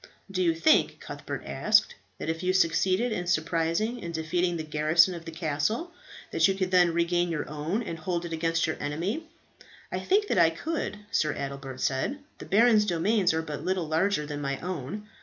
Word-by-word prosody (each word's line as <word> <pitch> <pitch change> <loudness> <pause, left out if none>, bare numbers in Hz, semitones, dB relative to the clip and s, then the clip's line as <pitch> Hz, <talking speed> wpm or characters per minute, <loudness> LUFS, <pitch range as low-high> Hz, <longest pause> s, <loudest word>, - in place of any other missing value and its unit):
"Do 185 -1 -1
you 170 -2 +2
think," 305 - +3
Cuthbert - - -7
asked, - - +2 0.2
"that - - -6
if 165 +1 -2
you 185 0 +1
succeeded 190 +5 +2
in 180 -4 -3
surprising 170 +7 0
and 170 - -4
defeating 170 +2 -1
the 160 - -4
garrison 155 +4 +3
of 170 -1 -8
the 165 - -6
castle 165 - -1 0.4
that - - +4
you 195 - +1
could 185 -1 -2
then 180 -2 +5
regain 175 +1 +1
your 160 -3 -3
own, 155 +10 -2
and 165 -6 -6
hold 175 +1 -2
it 165 - -5
against 165 0 +1
your 160 - -2
enemy?" 180 - -3 0.6
"I - - -2
think 410 +3 +2
that - - +2
I 165 -1 +6
could," 290 - -3
Sir 155 - +1
Adelbert 140 -1 -6
said. 135 - 0 0.2
"The - - -9
baron's 215 0 +5
domains 185 +2 +2
are 160 0 -1
but 150 -2 -6
little 185 -3 -1
larger 160 +1 +1
than 145 0 -5
my 140 -1 -2
own. 185 +4 -5
170 Hz, 195 wpm, -27 LUFS, 160-190 Hz, 0.6 s, I